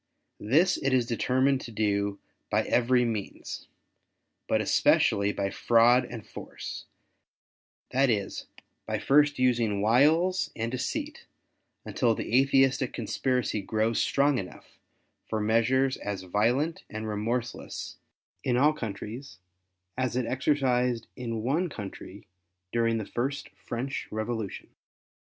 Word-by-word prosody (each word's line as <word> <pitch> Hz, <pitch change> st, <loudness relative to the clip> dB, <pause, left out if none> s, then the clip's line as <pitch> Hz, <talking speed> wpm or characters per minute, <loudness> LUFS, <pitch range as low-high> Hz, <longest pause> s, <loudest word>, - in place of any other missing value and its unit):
This 155 Hz, -, +3 dB
it 135 Hz, -1 st, 0 dB
is 125 Hz, -2 st, +3 dB
determined 130 Hz, +3 st, +1 dB
to 120 Hz, -, -8 dB
do 100 Hz, -2 st, 0 dB, 0.3 s
by -, -, +2 dB
every 125 Hz, 0 st, +3 dB
means, 110 Hz, -4 st, -5 dB, 0.8 s
but -, -, +2 dB
especially 100 Hz, 0 st, +3 dB
by 100 Hz, -1 st, -2 dB
fraud 120 Hz, +2 st, +4 dB
and 115 Hz, -3 st, -8 dB
force; -, -, -8 dB, 1.1 s
that 135 Hz, +1 st, +3 dB
is 100 Hz, -4 st, -2 dB, 0.4 s
by -, -, -1 dB
first 145 Hz, +1 st, +3 dB
using 120 Hz, -5 st, +2 dB
wiles 155 Hz, -, +3 dB
and 115 Hz, 0 st, -3 dB
deceit 295 Hz, -, -4 dB, 0.6 s
until 115 Hz, -3 st, +1 dB
the 115 Hz, -, -2 dB
Atheistic 135 Hz, -1 st, +3 dB
conspiracy 120 Hz, 0 st, -1 dB
grows 110 Hz, +3 st, 0 dB
strong 140 Hz, -2 st, +2 dB
enough 90 Hz, -, -10 dB, 0.5 s
for 110 Hz, -, -1 dB
measures 115 Hz, +5 st, +2 dB
as 100 Hz, -2 st, -5 dB
violent 120 Hz, -, 0 dB
and 110 Hz, 0 st, -5 dB
remorseless 115 Hz, +3 st, -3 dB, 0.5 s
in 125 Hz, -1 st, +1 dB
all 150 Hz, +4 st, +4 dB
countries 115 Hz, +1 st, -7 dB, 0.6 s
as 130 Hz, -2 st, 0 dB
it 125 Hz, -1 st, 0 dB
exercised 125 Hz, -3 st, +1 dB
in 115 Hz, -3 st, -4 dB
one 160 Hz, +9 st, 0 dB
country 100 Hz, -4 st, -9 dB, 0.5 s
during 115 Hz, -1 st, +1 dB
the 110 Hz, -, -3 dB
first 135 Hz, +7 st, -3 dB
French 130 Hz, +4 st, -5 dB
Revolution. 110 Hz, -1 st, -4 dB
120 Hz, 120 wpm, -28 LUFS, 110-135 Hz, 1.1 s, fraud